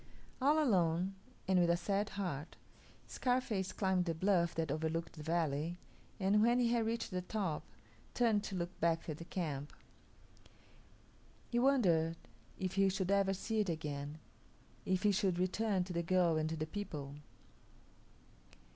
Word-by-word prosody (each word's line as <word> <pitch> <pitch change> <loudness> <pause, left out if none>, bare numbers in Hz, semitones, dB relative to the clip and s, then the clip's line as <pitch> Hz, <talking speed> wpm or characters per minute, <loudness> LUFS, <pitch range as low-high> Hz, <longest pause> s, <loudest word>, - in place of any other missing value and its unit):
All 290 +4 +4
alone, 185 - +2 0.3
and 185 -1 +4
with 175 -1 +3
a 170 - +4
sad 200 +3 0
heart, 170 -6 -3 0.5
Scarface 245 -7 -1
climbed 190 -2 +1
the 165 -2 -1
bluff 175 -1 +2
that 160 -3 -1
overlooked 160 +2 -2
the 155 - -9
valley, 160 0 -1 0.4
and 200 +2 +3
when 240 +2 +4
he 245 -2 +3
had 235 -2 +1
reached 230 -1 -2
the 180 0 -1
top, 180 -4 -2 0.5
turned 225 -4 +3
to 195 - -4
look 175 0 -4
back 165 0 +1
at 155 -2 -4
the 165 - -7
camp. 150 -6 -3 1.8
He 240 - +2
wondered 175 -12 +3 0.4
if 185 -1 -2
he 195 0 +4
should 190 0 -1
ever 195 -1 +3
see 220 +3 -2
it 205 -3 +1
again; 150 -2 -4 0.7
if 185 0 +1
he 210 - +5
should 190 -2 +1
return 185 +1 +1
to 180 0 -6
the 170 - 0
girl 175 -1 +3
and 155 0 0
to 160 - -2
the 155 - -2
people. 150 -6 -6
180 Hz, 155 wpm, -35 LUFS, 165-205 Hz, 1.8 s, he